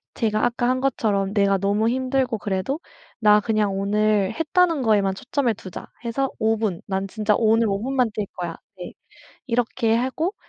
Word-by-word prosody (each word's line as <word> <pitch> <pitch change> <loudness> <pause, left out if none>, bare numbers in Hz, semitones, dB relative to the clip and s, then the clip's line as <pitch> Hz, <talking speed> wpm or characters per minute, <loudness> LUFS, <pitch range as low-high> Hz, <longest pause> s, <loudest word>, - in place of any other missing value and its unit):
제가 215 -2 +1
아까 240 0 0
한 255 0 +1
것처럼 205 -7 0
내가 200 -2 +3
너무 205 +3 +1
힘들고 255 -2 0
그래도 200 +9 -2 0.4
"나 210 -1 +6
그냥 210 -3 0
오늘 210 0 +1
했다는 330 -1 +2
거에만 200 -4 +2
초점을 255 +2 -1
두자." 185 -2 -9 0.2
해서 270 +4 -1
5 220 0 +2
분 210 -6 -2
"난 195 0 -2
진짜 210 +1 0
오늘 225 0 +3
5 200 0 -1
분만 255 -2 +1
뛸 210 - -2
거야." 175 -2 -4 0.2
네 180 - -8 0.5
이렇게 235 -2 +1
하고 265 - -1
220 Hz, 305 characters per minute, -23 LUFS, 200-250 Hz, 0.5 s, 나